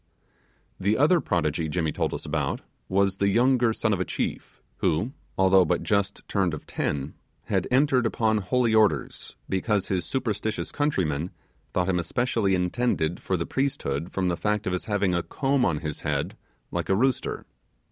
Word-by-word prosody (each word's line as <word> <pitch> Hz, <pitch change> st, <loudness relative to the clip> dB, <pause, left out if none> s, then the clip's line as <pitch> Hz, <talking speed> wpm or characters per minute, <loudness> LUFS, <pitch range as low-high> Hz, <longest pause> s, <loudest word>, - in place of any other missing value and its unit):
The 100 Hz, +3 st, +2 dB
other 155 Hz, +5 st, +4 dB
prodigy 80 Hz, -3 st, 0 dB
Jimmy 80 Hz, -1 st, 0 dB
told -, -, -1 dB
us -, -, -5 dB
about -, -, -1 dB, 0.3 s
was 100 Hz, 0 st, +2 dB
the 100 Hz, -, +2 dB
younger 120 Hz, +2 st, +3 dB
son 110 Hz, -1 st, 0 dB
of 95 Hz, -, -1 dB
a -, -, +2 dB
chief, -, -, -4 dB, 0.2 s
who, 90 Hz, +11 st, 0 dB, 0.3 s
although 95 Hz, 0 st, +6 dB
but 80 Hz, -, 0 dB
just 100 Hz, -1 st, 0 dB
turned 95 Hz, -5 st, +1 dB
of 75 Hz, -, -10 dB
ten, 70 Hz, 0 st, -2 dB, 0.3 s
had -, -, 0 dB
entered 130 Hz, -2 st, +3 dB
upon 110 Hz, -1 st, +1 dB
holy 115 Hz, +4 st, +1 dB
orders, 110 Hz, -2 st, +1 dB
because 95 Hz, +1 st, 0 dB
his 95 Hz, -3 st, 0 dB
superstitious 110 Hz, -4 st, -2 dB
countrymen 90 Hz, -, 0 dB, 0.4 s
thought 90 Hz, 0 st, 0 dB
him 90 Hz, -2 st, +1 dB
especially 115 Hz, +2 st, +1 dB
intended 90 Hz, -2 st, 0 dB
for 95 Hz, -, -1 dB
the 85 Hz, -, -2 dB
priesthood 95 Hz, -, -2 dB
from 95 Hz, -1 st, 0 dB
the 85 Hz, -1 st, 0 dB
fact 105 Hz, +2 st, 0 dB
of 90 Hz, -, -1 dB
his 90 Hz, -, -2 dB
having 100 Hz, -3 st, +1 dB
a 85 Hz, -, +1 dB
comb 135 Hz, +6 st, 0 dB
on 80 Hz, -8 st, +1 dB
his 75 Hz, -2 st, -4 dB
head -, -, -2 dB, 0.4 s
like -, -, -3 dB
a 95 Hz, -, +4 dB
rooster. 130 Hz, +4 st, 0 dB
100 Hz, 170 wpm, -26 LUFS, 90-120 Hz, 0.4 s, although